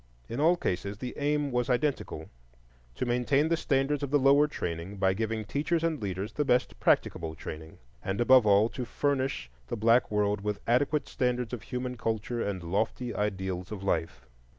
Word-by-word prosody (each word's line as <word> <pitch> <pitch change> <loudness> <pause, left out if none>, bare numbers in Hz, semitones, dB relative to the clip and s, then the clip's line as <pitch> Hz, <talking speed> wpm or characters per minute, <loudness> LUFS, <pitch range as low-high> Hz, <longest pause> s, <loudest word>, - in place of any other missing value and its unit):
In 115 - -4
all 165 +4 +4
cases 100 - -2
the 125 +2 -5
aim 145 0 0
was 125 +1 0
identical,—to 60 - -4
maintain 125 +5 +2
the 165 - +3
standards 140 -1 0
of 140 - -2
the 145 - +4
lower 140 +2 +5
training 85 - -5
by 95 -1 +2
giving 110 +1 -2
teachers 155 +7 -1
and 160 -5 0
leaders 95 0 -3
the 150 - 0
best 125 -3 +1
practicable 80 -1 +1
training; 80 +1 -8 0.3
and 95 +1 -2
above 125 -1 +6
all, 100 +2 +5
to 125 - -5
furnish 135 - -1 0.2
the - - -3
black 115 +3 +4
world 105 -1 +1
with 105 0 -2
adequate 140 +5 +1
standards 125 -1 -1
of 120 - -4
human 125 0 -4
culture 115 +1 -2
and 95 -5 -3
lofty 110 +7 -1
ideals 95 -3 -3
of 100 -2 -6
life. 85 -3 -2
115 Hz, 175 wpm, -29 LUFS, 95-135 Hz, 0.3 s, above